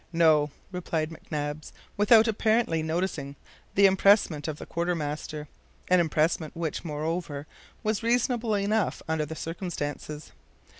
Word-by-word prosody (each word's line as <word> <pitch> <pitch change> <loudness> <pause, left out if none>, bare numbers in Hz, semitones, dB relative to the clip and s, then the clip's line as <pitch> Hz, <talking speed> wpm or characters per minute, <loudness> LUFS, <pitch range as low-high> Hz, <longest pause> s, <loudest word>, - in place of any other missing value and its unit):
"No," 155 -3 +4 0.2
replied 165 -3 -2
McNabbs, 150 -1 -5 0.2
without 220 +2 +6
apparently 220 -5 +2
noticing 160 -3 -2 0.4
the 200 - +6
EMPRESSMENT 190 -5 +4
of 155 -2 -3
the - - -8
quartermaster 155 -3 -3 0.4
an 180 0 +5
EMPRESSMENT 160 -1 +1
which, 165 -2 -3
moreover, 155 -1 -3 0.4
was 215 0 0
reasonable 235 -1 +1
enough 205 +1 0
under 160 -1 0
the 160 - -6
circumstances. 155 -3 -5
165 Hz, 115 wpm, -27 LUFS, 155-200 Hz, 0.4 s, without